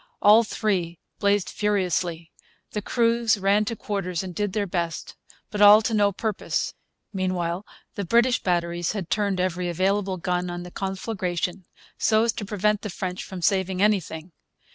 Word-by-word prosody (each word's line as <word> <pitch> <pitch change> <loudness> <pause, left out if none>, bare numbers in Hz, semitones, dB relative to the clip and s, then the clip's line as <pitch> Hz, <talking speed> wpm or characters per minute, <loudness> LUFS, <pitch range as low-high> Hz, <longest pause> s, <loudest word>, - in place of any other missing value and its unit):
All 215 +3 +7
three 185 -6 -1 0.2
blazed 200 -1 +2
furiously. 180 -5 -1 0.4
The 210 - -3
crews 230 0 +2
ran 200 +2 +2
to 230 +2 -3
quarters 190 -5 -3
and 185 -1 -6
did 205 +1 -2
their 205 0 0
best. 170 -4 -3 0.4
But 210 - -2
all 210 +1 +9
to 225 - -1
no 205 -1 +3
purpose. 215 +1 -2 0.4
Meanwhile 185 -1 -2 0.3
the 200 - -4
British 235 +5 +3
batteries 175 -1 0
had 190 -5 -5
turned 200 -3 0
every 180 -1 -1
available 190 +2 0
gun 180 0 -1
on 175 0 -5
the 180 - -10
conflagration, 185 -2 -3 0.3
so 220 0 +3
as 230 - +2
to 210 - -6
prevent 210 +1 0
the 210 - -5
French 185 0 -4
from 185 -3 -8
saving 190 -1 +1
anything. 185 -5 0
195 Hz, 160 wpm, -25 LUFS, 180-210 Hz, 0.4 s, all